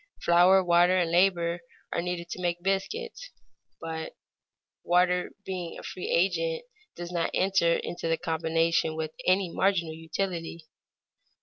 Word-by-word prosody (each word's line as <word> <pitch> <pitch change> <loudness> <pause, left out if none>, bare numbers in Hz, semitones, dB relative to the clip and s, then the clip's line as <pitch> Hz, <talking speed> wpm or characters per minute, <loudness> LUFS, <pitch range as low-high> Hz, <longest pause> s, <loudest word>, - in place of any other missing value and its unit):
Flour, 180 +2 +5
water, 175 +1 +4
and 170 -2 +1
labor 175 -1 +2 0.3
are - - 0
needed 175 -1 -4
to 180 - -6
make 175 -1 -2
biscuits; 455 - -3 0.5
but 160 -1 -5 0.7
water 180 +1 +2 0.2
being 180 -3 -5
a - - -10
free 180 - -6
agent, 480 - +1 0.3
does 175 0 -7
not 170 -2 0
enter 185 -3 +3
into 175 - -4
the 165 0 +1
combination 160 0 0
with 155 -1 -3 0.2
any 185 -1 +3
marginal 175 -5 +1
utility. 165 0 -4
175 Hz, 130 wpm, -28 LUFS, 165-190 Hz, 0.7 s, Flour